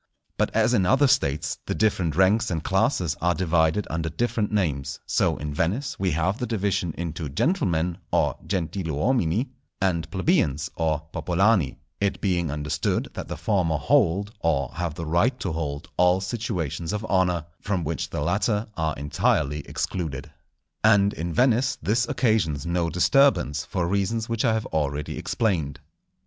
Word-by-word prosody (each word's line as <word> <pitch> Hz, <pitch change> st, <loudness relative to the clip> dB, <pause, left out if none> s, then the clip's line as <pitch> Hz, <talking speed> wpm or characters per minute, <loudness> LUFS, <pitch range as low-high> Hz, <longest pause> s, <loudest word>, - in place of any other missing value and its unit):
But -, -, +1 dB
as -, -, +3 dB
in -, -, +3 dB
other 135 Hz, +5 st, +4 dB
States 75 Hz, -, +1 dB
the -, -, -1 dB
different 95 Hz, -8 st, +1 dB
ranks 100 Hz, +5 st, +3 dB
and 80 Hz, -4 st, -2 dB
classes 85 Hz, -3 st, +1 dB
are 90 Hz, 0 st, +2 dB
divided 85 Hz, +2 st, +2 dB
under 80 Hz, 0 st, -2 dB
different 110 Hz, +3 st, -1 dB
names, 70 Hz, -9 st, -1 dB
so -, -, +1 dB
in 75 Hz, 0 st, -4 dB
Venice 100 Hz, -, -1 dB
we 95 Hz, -1 st, +1 dB
have 85 Hz, +6 st, 0 dB
the 125 Hz, -, -2 dB
division 100 Hz, -6 st, -1 dB
into 80 Hz, -3 st, -4 dB
gentlemen 85 Hz, -, 0 dB
(gentiluomini) 95 Hz, -, 0 dB, 0.3 s
and 90 Hz, -4 st, 0 dB
plebeians 95 Hz, -, +1 dB
(popolani), 80 Hz, -, +1 dB, 0.2 s
it 100 Hz, -1 st, 0 dB
being 90 Hz, -5 st, 0 dB
understood 75 Hz, +1 st, -1 dB
that -, -, -6 dB
the -, -, -5 dB
former 90 Hz, -7 st, +1 dB
hold, 100 Hz, +8 st, +2 dB
or 70 Hz, -6 st, 0 dB
have 85 Hz, -3 st, -3 dB
the 85 Hz, -, -5 dB
right 105 Hz, +11 st, +1 dB
to 90 Hz, -, -2 dB
hold 75 Hz, -3 st, -4 dB
all 90 Hz, +1 st, +4 dB
situations 95 Hz, -, -3 dB
of 105 Hz, +1 st, -3 dB
honour, 90 Hz, -5 st, +1 dB, 0.2 s
from 95 Hz, -4 st, -1 dB
which 80 Hz, +1 st, -3 dB
the -, -, -3 dB
latter 105 Hz, +6 st, +1 dB
are 80 Hz, -2 st, -1 dB
entirely 75 Hz, 0 st, 0 dB
excluded. 75 Hz, -7 st, -4 dB, 0.5 s
And 100 Hz, -2 st, +5 dB
in 85 Hz, +2 st, -4 dB
Venice 125 Hz, +5 st, +2 dB
this 115 Hz, +3 st, +1 dB
occasions 105 Hz, -, +1 dB
no 85 Hz, -1 st, 0 dB
disturbance, 90 Hz, -, +3 dB
for 90 Hz, -3 st, -2 dB
reasons 100 Hz, +4 st, 0 dB
which 115 Hz, +2 st, -1 dB
I 110 Hz, -2 st, +3 dB
have 110 Hz, -, -2 dB
already 75 Hz, -1 st, -2 dB
explained. 80 Hz, -, -1 dB
90 Hz, 150 wpm, -25 LUFS, 80-105 Hz, 0.5 s, And